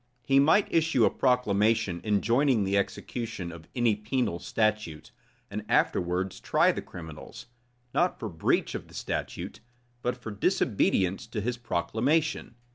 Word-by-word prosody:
He 135 0 +4
might 160 +9 +5
issue 160 -8 +3
a - - +3
proclamation 110 -6 +2
enjoining 115 +3 +2
the 100 +1 0
execution 100 -1 -3
of 80 -1 -11
any 120 -4 +3
penal 105 -3 -1
statute, 110 -9 -1 0.4
and - - -4
afterwards 90 +2 +1
try - - +3
the - - -4
criminals, 80 -3 -10 0.5
not 180 +1 +2
for 110 - -4
breach 80 -5 0
of - - -6
the - - -15
statute, - - -4 0.4
but 125 0 -1
for 120 -2 -7
disobedience 100 - +1
to 115 -1 -4
his 120 +4 -2
proclamation. 125 - 0
110 Hz, 135 wpm, -28 LUFS, 95-125 Hz, 0.5 s, might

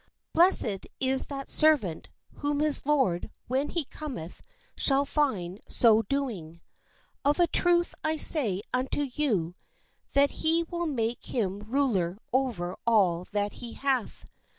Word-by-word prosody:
Blessed 320 - +5
is 265 0 0
that 275 -1 -7
ser 310 0 +4
vant, 180 - -8 0.3
whom 290 0 -2
his 300 -2 +2
lord 265 -13 0 0.2
when 265 +4 -1
he 335 -4 -2
cometh 255 - -8 0.3
shall 275 0 +5
find 210 - -2
so 225 -2 +4
do 275 +5 -2
ing. 170 -8 -9 0.6
Of 290 +4 +1
a 350 - +5
truth 345 0 +2
I 315 0 0
say 220 - +5
unto 260 +3 -1
you, 205 - -1 0.6
that 280 0 +3
he 325 +1 +2
will 345 0 -4
make 235 -5 -3
him 200 -5 -3
ruler 210 -6 -1 0.2
over 230 -10 -2
all 185 -6 +2
that 205 0 -2
he 235 -2 -7
hath. 270 -4 -3
260 Hz, 140 wpm, -27 LUFS, 205-295 Hz, 0.6 s, Blessed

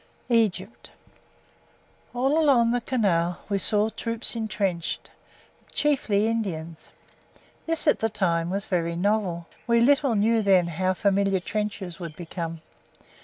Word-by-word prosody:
EGYPT 215 -2 0 1.3
All 270 +6 +2
along 240 -6 +4
the 245 0 0
canal 180 -9 +1
we 200 -1 0
saw 210 +2 +1
troops 230 +1 -3
entrenched 200 -7 -2 0.6
chiefly 230 -8 +1
Indians. 170 -8 -3 0.8
This 330 -1 0
at 295 - +3
the 225 - 0
time 175 -5 0
was 195 +2 -2
very 170 -2 -1
novel 185 -2 0 0.2
we 235 0 +4
little 275 0 +3
knew 220 +2 +3
then 190 -4 +4
how 185 +3 0
familiar 195 0 +2
trenches 200 -2 -4
would 170 -4 -7
become. 165 -1 -6
200 Hz, 120 wpm, -25 LUFS, 175-230 Hz, 1.3 s, along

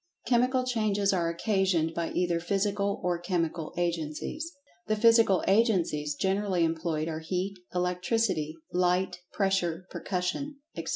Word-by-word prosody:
Chemical 255 +1 +3
changes 210 -5 +1
are 170 -3 +1
occasioned 175 -3 +1
by 170 0 -2
either 175 -2 +1
physical 200 +3 0
or 175 -1 0
chemical 170 -3 -2
agencies. 170 - -2 0.4
The 215 - +2
physical 230 -3 +5
agencies 180 -9 +2
generally 190 0 +1
employed 160 -1 -1
are 160 -1 -3
heat, 185 +4 -3 0.2
electricity, 180 -2 0 0.2
light, 180 0 +1
pressure, 190 -3 0
percussion, 190 +11 -2 0.2
etc. - - -5
180 Hz, 120 wpm, -29 LUFS, 170-205 Hz, 0.4 s, physical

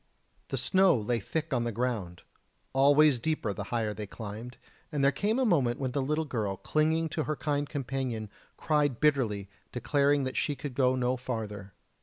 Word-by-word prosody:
The - - -3
snow 190 -6 +4
lay 115 +2 -1
thick 160 +9 -3
on 120 - +1
the 120 - -1
ground, 110 -7 -3 0.5
always 140 0 +5
deeper 120 -6 -1
the 100 - -5
higher 110 -1 -1
they 105 -1 -6
climbed, 110 +4 -8 0.3
and 145 -3 0
there 140 - +5
came 205 - 0
a 265 - +2
moment 135 - +2
when 130 -2 -1
the 140 +2 0
little 150 +4 0
girl, 105 -8 -2
clinging 160 +5 +1
to 155 -1 -2
her 155 - -1
kind 145 +1 -1
companion, 130 -6 -3 0.3
cried 145 -5 +1
bitterly, 120 -10 +1 0.2
declaring 140 +3 +2
that 130 0 -3
she 145 - 0
could 140 -1 -6
go 130 0 +3
no 125 0 0
farther. 105 -6 -5
130 Hz, 180 wpm, -29 LUFS, 115-150 Hz, 0.5 s, always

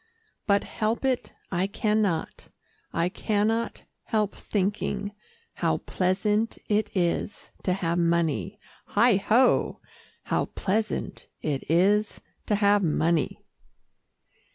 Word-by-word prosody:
But 200 -1 +3
help 225 +4 -2
it, 260 -2 0 0.2
I 185 +1 +1
can 215 +1 +1
not, 175 -6 -2 0.4
I 170 - +1
can 205 +3 0
not 230 +1 -2 0.2
help 210 -2 0
thinking, 205 0 -2 0.4
How - - 0
pleasant 210 +4 0
it 210 0 +1
is 180 +3 -1
to 185 - +1
have 175 -2 0
money, 170 +3 0 0.4
heigh 230 -1 +5
ho! 235 +6 +3 0.4
How - - 0
pleasant 210 +2 -2 0.2
it 145 -3 -1
is 200 +6 +3 0.3
to 210 - +2
have 205 0 +4
money!" 165 -2 0
205 Hz, 110 wpm, -26 LUFS, 180-215 Hz, 0.4 s, heigh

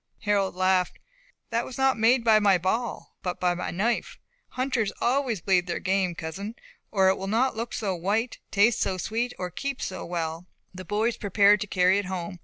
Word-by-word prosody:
Harold 200 -3 +1
laughed. 185 -1 +1 0.5
"That 235 - +1
was 255 - -8
not 265 0 +3
made 230 +2 +3
by 220 -2 +5
my 200 -3 +4
ball, 220 +7 -2
but 180 -1 -3
by 180 -1 +2
my 175 - -4
knife. 215 +7 -1 0.3
Hunters 255 -5 -1
always 245 -6 0
bleed 180 -1 +2
their 170 - -2
game, 185 -2 0
cousin, 195 +8 -6 0.3
or 190 -2 +3
it 190 - +1
will 195 - -4
not 235 +5 +1
look 230 +2 -4
so 200 -4 -2
white, 205 +7 -1
taste 215 +3 +3
so 185 - 0
sweet, 230 +6 -2
nor 180 -1 -4
keep 275 - -4
so 185 - -4
well." 165 0 -4 0.3
The 185 0 -9
boys 215 +5 0
prepared 205 0 +4
to 205 - -3
carry 185 +1 +3
it 205 - -3
home. 180 -1 -5
200 Hz, 195 wpm, -26 LUFS, 185-230 Hz, 0.5 s, by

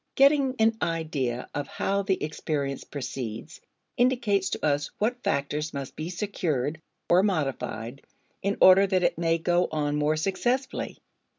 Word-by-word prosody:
Getting 275 -1 +4
an 225 0 +3
idea 145 -7 -2
of 145 -1 -3
how 200 +1 -1
the 195 -1 -1
experience 145 -2 -3
proceeds 125 -5 -6 0.4
indicates 235 -6 +2
to - - -3
us 145 -1 +1
what 245 +4 -1
factors 150 - -1
must 140 -2 -5
be 155 +2 -4
secured 160 - -2 0.3
or 175 +2 +5
modified 135 - -2 0.4
in 200 +1 -1
order 190 +1 +8
that 185 -2 +1
it 175 - +1
may 165 -1 +2
go 175 +2 +2
on 150 -1 0
more 150 +1 +2
successfully. 220 - -1
165 Hz, 140 wpm, -27 LUFS, 145-200 Hz, 0.4 s, order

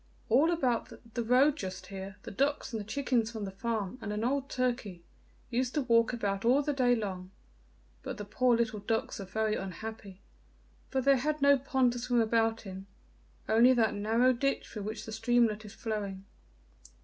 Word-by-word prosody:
All 275 +9 +5
about 260 -9 0 0.2
the 235 - -1
road 260 +5 +4
just 185 -7 -6
here, 195 0 -6
the - - -7
ducks 280 +3 -1
and 225 - -2
the - - -4
chickens 245 -3 0
from 220 -3 -5
the 195 - -5
farm, 220 +2 -3
and 210 - -4
an 210 +1 -2
old 275 +3 0
turkey, 240 -8 -2 0.5
used 250 +2 -1
to 295 - +1
walk 230 -2 +3
about 200 -5 -2
all 255 +5 +4
the 295 - 0
day 250 -3 +3
long, 190 -5 -4 0.7
but - - -6
the 210 - -6
poor 245 +3 +2
little 235 -2 -1
ducks 225 +2 -2
were 195 - -5
very 220 +2 -1
unhappy, 195 +1 -7 0.7
for 265 - 0
they 275 0 +4
had 305 +3 -1
no 280 0 +6
pond 260 -2 +1
to 245 - -4
swim 245 0 +1
about 225 0 +1
in, 190 0 -8 0.6
only 235 +4 +6
that 225 -4 +2
narrow 225 +5 +3
ditch 275 +3 -1
through 215 - -7
which 215 +2 -5
the 220 - -7
streamlet 225 -1 +1
is 205 - -11
flowing. 200 -4 -4
230 Hz, 185 wpm, -30 LUFS, 210-255 Hz, 0.7 s, no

